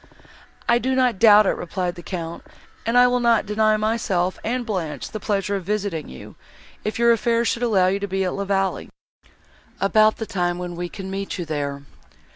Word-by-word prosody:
"I 235 0 +4
do 260 +1 0
not 250 -6 +2
doubt 210 -2 +7
it," - - +3
replied 180 0 -3
the 175 - -10
Count, 170 -2 -6 0.5
"and 235 +2 +2
I 245 - +8
will 250 0 +2
not 235 -2 +3
deny 215 +1 +2
myself 210 -5 -1
and 245 +1 -2
Blanche 180 -9 -4
the 215 - -5
pleasure 200 -1 -1
of 195 - -3
visiting 200 -6 -2
you, 65 - -11 0.5
if 215 - -3
your 235 0 +4
affairs 235 0 +1
should 235 - -2
allow 210 -6 +3
you 190 +2 +1
to 200 - -3
be 195 0 -1
at 180 - -1
La 200 - -3
Vallée, 195 -1 -1 0.9
about 215 +2 +4
the 220 - -4
time 175 -3 -1
when 175 -1 -5
we 175 0 -4
can 190 -1 -7
meet 195 +1 -4
you 175 - -4
there." 140 -2 -3
200 Hz, 200 wpm, -22 LUFS, 180-225 Hz, 0.9 s, I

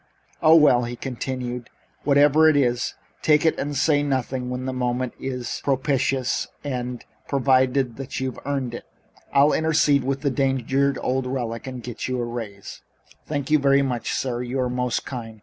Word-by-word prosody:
"Oh, 160 +1 +7
well," 125 -6 +5
he 120 +1 -5
continued, 125 -1 -5 0.4
whatever 145 +2 +5
it 150 - +3
is, 120 -3 +1 0.3
take 150 +1 +3
it 160 - +2
and 145 0 -2
say 145 +1 +3
nothing 130 -2 -1
and 125 0 -5
when 125 0 -4
the 130 - -2
moment 125 0 -1
is 125 -2 -4
propitious 135 -1 0 0.2
and 125 -3 -4 0.2
provided 130 -2 +2 0.2
you've 130 -2 -3
earned 135 -4 -2
it 120 - -7 0.5
I'll 140 +2 +5
intercede 150 -3 +3
with 135 +1 -2
the 140 -2 +1
danged 135 -1 -1 0.3
old 130 0 0
relic 120 -2 -3
and 130 -2 -6
get 120 -1 -5
you 130 -1 -2
a 120 - -1
raise." 110 -4 -7 0.5
"Thank 145 -1 -3
you 155 - +5
very 140 0 +4
much, 125 -3 -2
sir. 125 -2 -2
You 125 +2 -3
are 125 -1 -1
most 125 -1 -1
kind. 115 -4 -7
130 Hz, 170 wpm, -23 LUFS, 125-140 Hz, 0.5 s, Oh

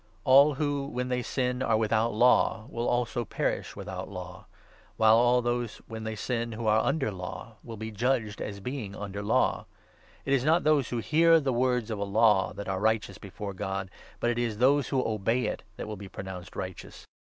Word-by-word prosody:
n - - -35 0.2
All 140 +3 +6
who, 145 -1 -1
when 125 -2 -3
they 125 0 0
sin, 125 +1 -1
are 115 -3 +2
without 110 +1 +1
Law 115 -1 +3
will 120 +1 -1
also 120 0 0
perish - - -2
12 - - -18
without - - -6
Law; - - -9 0.5
while 110 0 +6
all 120 +1 +4
who, 120 0 0 0.2
when 110 -1 -7
they 110 0 -3
sin, 115 +1 -3
are 110 -1 +2
under 140 -6 0
Law, 95 +4 -8
will 115 -2 -8
be 110 +1 -5
judged 110 -1 -1
as 100 -1 -5
being 115 -3 -5
under 100 -1 -5
Law. 100 - +1 0.6
It 135 - +1
is 130 -2 +2
not 160 +4 +3
those 150 -4 +3
who 120 - -2
hear 165 +8 +4
13 160 - +3
the 135 -2 0
words 125 -2 +1
of 105 - -3
a - - 0
Law 100 -1 +3
that 100 - -7
are 95 -1 -1
righteous 110 +1 0
before 100 0 -7
God, 95 0 -4 0.3
but 120 - +1
it 120 - -2
is 115 -3 -1
those 135 +3 +3
who 130 -2 0
obey 115 +3 0
it - - -3 0.2
that - - -5
will 105 - -5
be 100 0 -9
pronounced 95 -2 -8
righteous. 95 -1 -7
115 Hz, 210 wpm, -28 LUFS, 105-125 Hz, 0.6 s, All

